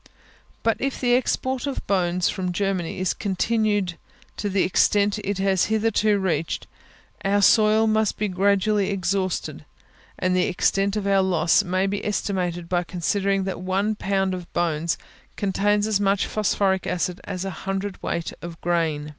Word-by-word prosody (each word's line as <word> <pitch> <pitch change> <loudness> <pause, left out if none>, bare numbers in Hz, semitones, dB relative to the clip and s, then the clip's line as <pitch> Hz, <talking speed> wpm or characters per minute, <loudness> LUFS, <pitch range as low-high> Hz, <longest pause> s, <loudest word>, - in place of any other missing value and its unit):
But 225 -1 +2
if 275 0 -2
the 245 -1 +2
export 260 +1 0
of 275 - -4
bones 180 -2 +1
from 180 -1 -2
Germany 190 -2 -1
is 185 0 0
continued 205 -2 0 0.4
to 205 - -2
the 195 -1 +2
extent 205 +3 +2
it 200 -1 -3
has 190 -1 +2
hitherto 215 -1 +2
reached, 165 -5 -1 0.6
our 200 +1 +2
soil 215 +2 +5
must 215 -1 +1
be 210 - 0
gradually 200 +2 +2
exhausted, 190 -1 -2 0.5
and 185 0 +1
the 180 - +2
extent 195 +2 +1
of 210 -2 -2
our 195 -1 +3
loss 175 -1 +3
may 185 0 0
be 200 +1 -2
estimated, 180 -4 -2
by 175 0 0
considering 195 +2 0
that 190 -2 -4
one 195 +3 0
pound 195 -2 0
of 180 -2 -7
bones 165 -1 0 0.4
contains 205 +1 +1
as 215 -2 +1
much 200 -1 +2
phosphoric 195 -3 0
acid 180 0 -2
as 190 -1 -4
a 195 - -3
hundred 195 +1 -4
weight 170 - -3
of 170 -1 -8
grain. 160 -4 -1
195 Hz, 155 wpm, -24 LUFS, 180-205 Hz, 0.6 s, soil